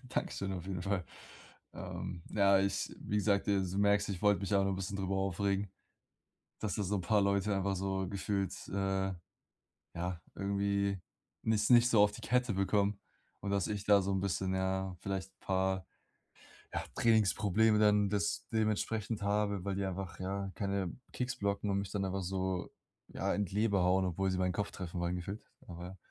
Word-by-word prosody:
Dankeschön 100 -5 -2
auf 90 -2 -5
jeden 90 -2 -3
Fall. 100 -2 -1 0.7
Ähm, 85 - -6
ja 100 -1 +5
ich 100 0 0
wie 105 - -2
gesagt, 100 -1 +2
äh, 100 -1 +3
du 95 +1 -2
merkst, 100 0 +3
ich 95 0 -4
wollte 105 -3 +4
mich 100 +1 -1
auch 100 0 +4
noch 95 - +1
'n - - -2
bisschen 95 +1 -3
darüber 95 0 -1
aufregen, 95 +1 0 0.9
dass 110 - -2
da 105 - -1
so 100 +2 0
‘n 95 - -1
paar 100 +4 +3
Leute 100 +1 +2
einfach 95 0 0
so 95 0 -1
gefühlt, 100 -1 -1 0.2
äh, 95 -1 0 0.8
ja, 90 -1 -3
irgendwie 100 0 0 0.4
nicht 110 0 +2
nicht 120 0 +7
so 115 -4 +6
auf 105 - +4
die - - -10
Kette 125 -1 +1
bekommen. 100 +1 +1 0.4
Und, 100 - -3
dass 100 -2 +1
ich 105 -1 -3
da 100 -1 +6
so 95 +1 -1
‘n 95 - +1
bisschen, 95 -1 0
ja, 95 0 -1
vielleicht 95 -1 -3
‘n - - -44
paar, 95 -1 0 0.9
ja, - - 0
Trainingsprobleme 110 -1 +4
dann 105 -1 +4
das 105 0 0
dementsprechend 110 0 0
habe, 100 -2 0
weil 100 -1 -1
die 100 - -1
einfach, 95 -1 -5
ja, 95 +1 -2
keine 100 -2 -1 0.2
Kicks 125 -1 -2
blocken 100 0 -1
und 100 - +1
mich 100 -1 -3
dann 100 -2 0
einfach 95 0 -2
so, 95 0 -2 0.4
ja, - - -1
in 105 - +1
die 95 - -8
Leber 105 -3 +3
hauen, 95 +1 +3
obwohl 95 +2 0
sie 95 - -1
meinen 90 0 +1
Kopf 100 +3 -2
treffen 90 -1 -5
wollen 85 +1 0
gefühlt, 95 +5 -6 0.2
aber 90 +2 -8
100 Hz, 190 wpm, -33 LUFS, 95-100 Hz, 0.9 s, nicht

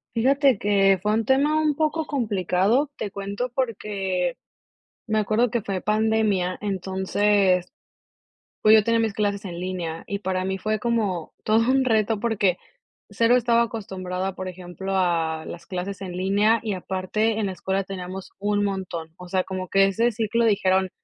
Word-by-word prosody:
Fíjate 270 0 +3
que 195 -2 +3
fue 210 +2 +1
un 225 - 0
tema 285 +5 +3
un 305 -1 +2
poco 315 +1 0
complicado. 215 - +1
Te 205 - -3
cuento, 200 +5 -4
porque 195 -7 -2 0.7
me 215 -1 +1
acuerdo 215 +3 +2
que 235 - -1
fue 195 -3 -3
pandemia, 215 -4 +1
entonces, 190 0 +1 0.9
pues 215 0 +7
yo 220 - +7
tenía 230 +1 +2
mis 225 -2 0
clases 200 0 -1
en 175 -2 -6
línea, 175 -3 -4
y 200 - -3
para 185 -2 -2
mí 190 0 -2
fue 215 +2 -1
como 210 -7 -1
todo 225 +2 +3
un 265 0 +3
reto, 220 -2 +2
porque 205 -5 +1 0.5
cero 230 +1 +3
estaba 235 -1 +3
acostumbrada 190 -5 -4
a, 190 - -8
por 185 - -5
ejemplo, 185 +1 -6
a 165 -3 0
las 170 - -9
clases 190 +2 -5
en 185 -2 -5
línea, 205 +4 +3
y 215 -3 -2
aparte 190 +4 -1
en 215 - 0
la 190 - -2
escuela 190 +1 -2
teníamos 185 0 -7
un 205 0 0
montón. 180 -5 -4
O 180 - -10
sea, 185 0 +1
como 185 0 -5
que 195 0 +5
ese 225 +5 +1
ciclo 230 +1 0
dijeron: 190 -3 +2
200 Hz, 170 wpm, -24 LUFS, 185-225 Hz, 0.9 s, pues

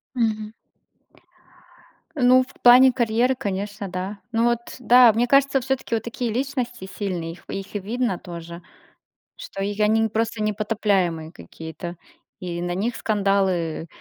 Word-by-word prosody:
Мгм. 215 -3 -1 1.6
Ну, 255 -2 +5
в 255 - -16
плане 255 +2 +8
карьеры, 240 +1 +1
конечно, 200 -3 -4
да. 185 +3 -5
Ну, 230 0 +2
вот, 235 0 -1
да. 245 -1 +7
Мне 235 +3 +1
кажется, 275 0 +3
всё-таки 265 -2 -2
вот 225 - -2
такие 235 0 -3
личности 245 -4 -3
сильные, 175 -5 -3
их 175 - -16
их 195 +1 -6
видно 235 -2 -1
тоже, 170 0 -9 0.7
что 195 - -8
её 205 +1 0
они 220 +1 +3
не 225 - +1
просто 225 0 -2
непотопляемые 205 -6 0
какие-то, 160 - -9 0.4
и 175 -1 -5
на 175 0 -2
них 220 +6 -2
скандалы, 195 -6 0
215 Hz, 135 wpm, -23 LUFS, 185-240 Hz, 1.6 s, плане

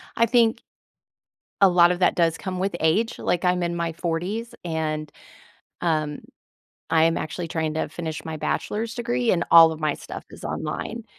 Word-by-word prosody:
I 230 - +3
think 230 -1 +3 1.0
a 195 - +8
lot 175 -1 +5
of 180 - -2
that 180 - +3
does 165 -2 +2
come 185 -2 -5
with 190 -1 -1
age. 210 +9 +1
Like, 175 - 0
I'm 180 0 +2
in 170 0 -1
my 170 -1 -2
40s, 180 +8 -3
and, 155 -3 -3 0.7
um, 155 -3 -1 0.7
I 160 0 +4
am 165 0 +2
actually 170 +2 -4
trying 160 -1 -2
to 160 - -1
finish 160 -3 -5
my 160 -1 -5
bachelor's 225 +8 -2
degree, 240 0 0
and 175 -1 +1
all 165 -1 +9
of 160 - -7
my 155 -2 0
stuff - - -9
is - - -12
online. - - -4
170 Hz, 175 wpm, -24 LUFS, 160-195 Hz, 1.0 s, all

